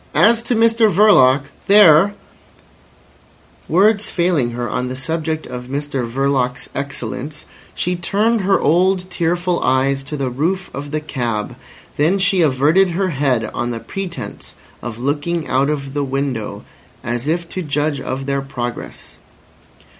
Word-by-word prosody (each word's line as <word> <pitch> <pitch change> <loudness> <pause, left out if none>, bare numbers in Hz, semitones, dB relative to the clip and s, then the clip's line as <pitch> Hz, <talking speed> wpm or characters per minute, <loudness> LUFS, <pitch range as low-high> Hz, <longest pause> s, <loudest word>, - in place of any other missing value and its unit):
As 230 +1 +4
to 245 - +2
Mr 225 -1 +4
Verloc—there—" 175 +1 +5 1.5
Words 210 +3 +3
failing 170 -8 +1
her 120 0 -3
on 125 +1 -2
the 130 - -4
subject 160 +4 -3
of 125 0 -7
Mr 135 -3 -3
Verloc's 130 -1 -1
excellence, 140 +1 -5 0.3
she 180 +1 -1
turned 210 +6 +1
her 195 +1 +2
old 185 +3 +2
tearful 175 +1 0
eyes 135 +1 +1
to 150 +2 -5
the 135 -2 -2
roof 175 +9 -2
of 145 +1 -6
the 155 +1 -2
cab. 120 -8 -3 0.4
Then 160 +7 +3
she 190 -1 +2
averted 155 +6 +3
her 185 +2 -1
head 135 -7 0
on 120 - -2
the 115 -1 -4
pretence 185 +5 -7 0.3
of 120 -2 -6
looking 145 +6 -2
out 135 +2 +1
of 140 -2 -3
the 145 0 -1
window, 135 -5 -3 0.4
as 120 +3 -3
if 170 +2 -1
to 185 - -4
judge 145 -2 -1
of 135 +1 -4
their 140 0 -1
progress. 120 -3 -7
145 Hz, 140 wpm, -18 LUFS, 130-180 Hz, 1.5 s, Verloc—there